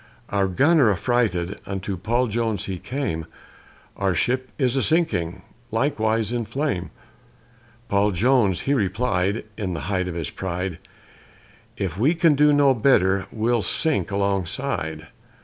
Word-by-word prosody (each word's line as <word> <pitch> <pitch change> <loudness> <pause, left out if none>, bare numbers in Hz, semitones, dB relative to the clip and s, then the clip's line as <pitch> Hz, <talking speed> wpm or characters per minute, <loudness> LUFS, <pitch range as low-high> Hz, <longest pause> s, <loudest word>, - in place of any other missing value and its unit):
Our 100 -1 +1
gunner, 140 - +4
affrighted, 100 -3 0
unto 95 0 -3
Paul 120 +8 0
Jones 110 -3 -1
he 95 -2 -4
came, 100 - -3 0.7
"Our 95 -2 0
ship 130 +8 0
is 130 -3 +1
a 135 - +2
sinking, 95 - 0 0.3
likewise 115 -3 0
in 120 -1 -1
a - - -4
flame;" 115 - -2 1.0
Paul 100 +1 +2
Jones 105 -1 +2
he 140 - 0
replied, 100 -3 0
in 95 -5 -3
the 80 - -4
height 95 -1 0
of 90 - -5
his 80 -4 -3
pride, 90 -2 -4 1.0
"If 95 -2 -3
we 145 +9 +3
can 165 -2 +4
do 150 +1 +4
no 145 -2 +5
better, 100 -6 +3
we'll 115 +1 +1
sink 140 - +1
alongside." 100 - -2
105 Hz, 140 wpm, -23 LUFS, 95-130 Hz, 1.0 s, no